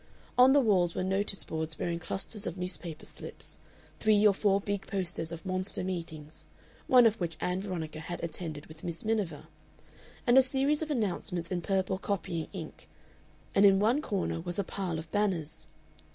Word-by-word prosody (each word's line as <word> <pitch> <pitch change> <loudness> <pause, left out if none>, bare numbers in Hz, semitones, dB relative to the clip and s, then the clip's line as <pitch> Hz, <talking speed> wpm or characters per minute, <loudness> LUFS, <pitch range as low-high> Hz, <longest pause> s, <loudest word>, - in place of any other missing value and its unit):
On 250 +1 +7
the 285 - +6
walls 185 -9 +3
were - - 0
notice 195 +1 0
boards 160 0 -3
bearing 170 0 -2
clusters 200 +4 -3
of 175 +1 -4
newspaper 180 -3 -3
slips, - - -5 0.4
three 215 -1 +4
or 205 - +7
four 195 0 +2
big 200 -1 -3
posters 175 -4 -2
of 170 +3 -7
monster 185 0 -1
meetings, 160 -4 -5 0.4
one 250 -2 +7
of 225 -1 +4
which 165 -2 -2
Ann 180 +1 -1
Veronica 165 -6 -4
had 175 +3 -6
attended 160 -3 -5
with 155 0 -14
Miss 170 +3 -2
Miniver, 205 -9 -1 0.8
and 250 0 +7
a - - +9
series 275 +3 +1
of 315 - -3
announcements 190 - -1
in 180 -1 0
purple 190 +1 0
copying 170 -5 -2
ink, - - -8 0.6
and 195 - +5
in 195 -1 +7
one 230 +8 +3
corner 195 - -2
was 175 +1 -2
a 200 - +2
pile 180 -3 -3
of 160 0 -8
banners. 185 -7 -1
185 Hz, 175 wpm, -30 LUFS, 170-205 Hz, 0.8 s, a